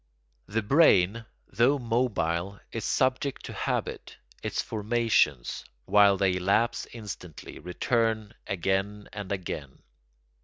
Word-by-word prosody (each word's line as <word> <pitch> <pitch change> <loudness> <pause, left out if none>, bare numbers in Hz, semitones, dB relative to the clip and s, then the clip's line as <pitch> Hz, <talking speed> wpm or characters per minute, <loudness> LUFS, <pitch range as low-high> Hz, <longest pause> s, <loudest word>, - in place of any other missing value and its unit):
The 110 +2 -1
brain, 115 - +4 0.2
though 120 +8 +3
mobile, 100 -7 -1
is 115 - -4
subject 130 +2 0
to - - -7
habit; - - -3 0.2
its - - -3
formations, 110 - +1 0.2
while 100 -1 +5
they 95 -1 +2
lapse 110 +6 +1
instantly, 100 -7 -8
return 110 +4 0
again 95 +2 -1
and 105 -2 -6
again. 80 -8 -5
105 Hz, 105 wpm, -28 LUFS, 95-115 Hz, 0.2 s, while